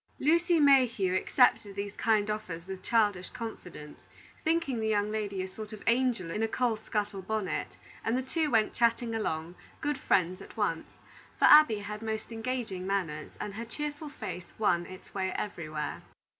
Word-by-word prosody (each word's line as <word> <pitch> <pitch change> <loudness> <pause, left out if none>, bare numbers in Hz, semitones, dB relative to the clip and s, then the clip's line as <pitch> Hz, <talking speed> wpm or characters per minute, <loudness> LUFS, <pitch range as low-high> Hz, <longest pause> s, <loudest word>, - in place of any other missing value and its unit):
Lucy 335 +3 +3
Mayhew 250 -10 +4
accepted 205 0 +3
these 200 0 -4
kind 215 -2 +2
offers 180 -6 -5
with 190 0 -7
childish 205 -5 +2
confidence, 180 -10 -9 0.3
thinking 320 -7 +1
the 220 - -1
young 210 -1 +1
lady 205 -3 -2
a - - -4
sort 215 +3 -8
of 215 - -9
angel 235 -7 +2
in 210 - -2
a 225 - +2
coal 240 0 +1
scuttle 210 -2 -3
bonnet, 210 0 -3 0.3
and 225 +2 +1
the 260 - -1
two 310 +4 0
went 225 -4 +2
chatting 235 0 +2
along, 165 -6 -2 0.3
good 295 -3 -1
friends 185 0 +1
at - - -12
once; - - -2 0.4
for - - +4
Abby 300 -8 +8
had 210 +1 -6
most 220 0 -4
engaging 225 -5 -3
manners, 170 -6 -2
and 205 - -4
her 225 +3 -5
cheerful 295 +4 -5
face 180 -11 -7
won 175 -5 +2
its 185 0 -12
way 190 -1 -1
everywhere. 155 -7 -4
215 Hz, 170 wpm, -30 LUFS, 190-245 Hz, 0.4 s, Abby